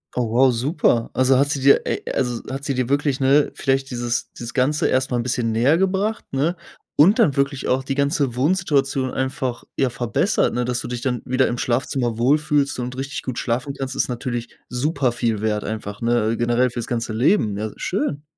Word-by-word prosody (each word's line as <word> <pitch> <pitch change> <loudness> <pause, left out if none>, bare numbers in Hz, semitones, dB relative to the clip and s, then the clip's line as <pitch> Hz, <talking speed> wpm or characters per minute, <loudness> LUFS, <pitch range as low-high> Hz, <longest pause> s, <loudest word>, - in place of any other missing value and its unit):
Oh 120 -2 0
wow, 125 +3 +4
super. 120 -1 +1
Also 130 0 +3
hat 140 +1 +3
sie 140 -3 -1
dir, 140 +1 +5
äh - - -1
also 125 -3 -1
hat 135 +1 -5
sie 140 - 0
dir 130 -1 -1
wirklich, 140 -1 0
ne, 140 +2 +4
vielleicht 135 0 0
dieses 120 0 -2
dieses 120 0 -7
Ganze 145 +3 +1
erst 130 0 +1
mal 125 - -1
'n 120 - -1
bisschen 120 -2 -1
nähergebracht, 190 - +1
ne, 155 +6 0 0.4
und 180 +8 +6
dann 160 - +3
wirklich 140 -1 0
auch 130 +1 +2
die 135 +1 -3
ganze 140 -3 0
Wohnsituation 140 -3 +1
einfach, 130 -2 -2
ja, 135 - +2
verbessert. 125 - 0
Ne, 125 0 -1
dass 125 0 -1
du - - -6
dich 125 -1 -3
dann 125 -1 -1
wieder 130 +1 +1
im 120 - -2
Schlafzimmer 120 -1 -1
wohlfühlst 145 +3 +2
und 125 +1 -4
richtig 135 +1 -4
gut 130 -2 -4
schlafen 125 +3 -2
kannst 135 -1 -5
ist - - 0
natürlich 120 -1 -4 0.2
super 130 0 0
viel 115 -3 -1
Wert 105 0 -1
einfach, 105 -1 -5
ne, 115 -1 +1
generell 120 +2 +2
für's 120 -1 -5
ganze 115 -2 -2
Leben, 115 - +2
ja 110 +1 -3
schön. 180 - -2
130 Hz, 200 wpm, -21 LUFS, 120-140 Hz, 0.4 s, und